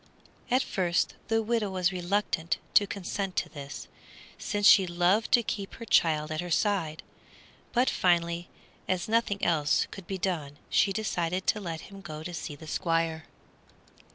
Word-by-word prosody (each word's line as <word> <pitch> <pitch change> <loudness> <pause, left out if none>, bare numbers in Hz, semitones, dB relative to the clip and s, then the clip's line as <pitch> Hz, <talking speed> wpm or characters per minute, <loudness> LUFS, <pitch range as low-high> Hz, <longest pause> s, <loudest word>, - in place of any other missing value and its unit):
At 255 +2 +3
first 175 -3 0
the 225 0 +1
widow 225 -2 0
was 185 -1 +1
reluctant 180 -2 -1 0.2
to 205 - +5
consent 195 0 -4
to - - -1
this, 140 -2 -8 0.5
since 205 -1 -1
she 190 -2 +8
loved 175 +5 +2
to 240 -2 +6
keep 200 -2 -4
her 230 - -8
child 155 -6 +3
at 155 +1 -1
her 175 - -6
side, 165 -4 0 0.7
but 250 +1 +2
finally, 170 -1 +1 0.4
as 185 -1 -1
nothing 220 -3 +1
else 155 -3 +2
could 195 -3 -10
be 195 - -3
done, 160 -6 -2
she 195 - +4
decided 185 -3 -1
to 210 - +1
let 165 -4 -5
him 195 -1 -11
go 155 -3 -7
to 175 +2 -6
see 150 -2 -5
the 160 - -12
Squire. 165 -1 -1
180 Hz, 160 wpm, -28 LUFS, 165-205 Hz, 0.7 s, she